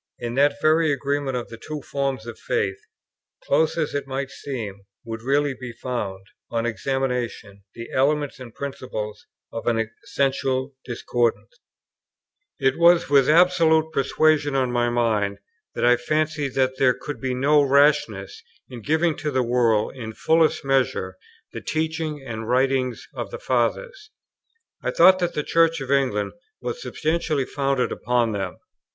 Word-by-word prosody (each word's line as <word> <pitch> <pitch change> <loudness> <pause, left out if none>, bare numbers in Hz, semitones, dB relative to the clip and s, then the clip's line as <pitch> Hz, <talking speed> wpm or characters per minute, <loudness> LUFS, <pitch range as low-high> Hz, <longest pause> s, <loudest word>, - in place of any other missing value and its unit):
In 120 0 -4
that 145 +2 +2
very 155 +1 +3
agreement 140 -1 -1
of 120 - -5
the 115 - -9
two 150 +1 -6
forms 135 -4 -2
of 120 - -8
faith, 95 0 -1 0.6
close 155 +3 +2
as 155 -3 -1
it 140 -1 -3
might 135 0 -3
seem, 110 -8 -6 0.2
would 115 -1 -6
really 140 +3 +1
be 125 -2 -8
found, 105 -6 -4 0.2
on 115 0 -1
examination, 120 -4 -2
the 115 0 -8
elements 145 +1 +1
and 125 -2 -9
principles 130 -6 -6 0.3
of 115 - -5
an 115 -2 +1
essential 135 0 -1
discordance. 120 - -1 1.0
It 135 +2 +1
was 170 -2 +5
with 140 -2 +5
this 155 - +5
absolute 165 -3 +4
persuasion 145 +1 +2
on 130 -2 +1
my 120 0 +1
mind 110 -4 0 0.4
that - - 0
I 120 0 +5
fancied 155 +1 -1
that 130 0 +1
there 130 -2 +4
could 145 - -7
be 130 -1 -1
no 145 +3 +4
rashness 140 -8 +2 0.3
in 120 -2 -8
giving 160 +5 +1
to 150 - -2
the 130 -3 +1
world 115 -3 +1
in 110 -4 -6
fullest 160 +3 +2
measure 130 -8 0 0.4
the - - -6
teaching 160 -2 -2
and 110 -3 -5
the - - -6
writings 130 0 +1
of - - -5
the 475 - -6
Fathers. - - -1 0.7
I - - -1
thought 185 +2 +6
that 175 -1 -1
the 150 - -1
Church 165 0 +3
of 135 0 -5
England 125 -7 +1 0.3
was 485 - -5
substantially 155 -3 -1
founded 135 -2 0
upon 120 -2 0
them. 95 -3 -4
135 Hz, 155 wpm, -23 LUFS, 120-150 Hz, 1.0 s, thought